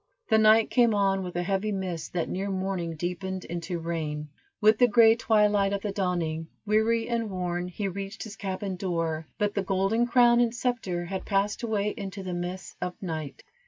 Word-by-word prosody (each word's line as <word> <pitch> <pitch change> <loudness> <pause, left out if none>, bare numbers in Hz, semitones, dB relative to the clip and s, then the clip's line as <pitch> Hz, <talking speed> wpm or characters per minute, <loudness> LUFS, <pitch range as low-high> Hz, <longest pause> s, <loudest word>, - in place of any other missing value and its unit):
The 220 - +5
night 220 +1 +5
came 235 -4 +4
on 195 -1 +2
with 180 -2 -6
a 175 - 0
heavy 195 +3 0
mist 185 -5 -4
that 175 -2 -1
near 195 +2 -3
morning 185 -3 -2
deepened 180 +3 -4
into 170 +1 -4
rain. 155 -3 -3 0.3
With 215 0 +5
the 245 - +7
gray 225 0 +6
twilight 210 -3 +3
of 200 - -2
the 210 - -1
dawning, 175 -5 -1 0.2
weary 220 +2 +2
and 230 -2 -1
worn, 180 -2 -2
he 195 +3 -3
reached 195 +2 -5
his 220 -2 -8
cabin 190 -1 -4
door, 165 -4 -2
but 205 -2 0
the 200 - 0
golden 195 +5 +1
crown 240 -1 +5
and 240 -1 +2
scepter 220 -8 -2
had 190 +2 -4
passed 200 +1 0
away 210 -3 0
into 195 -2 -6
the 185 -1 -4
mists 175 +1 -5
of 180 0 -4
night. 155 -6 -5
195 Hz, 190 wpm, -27 LUFS, 175-215 Hz, 0.3 s, the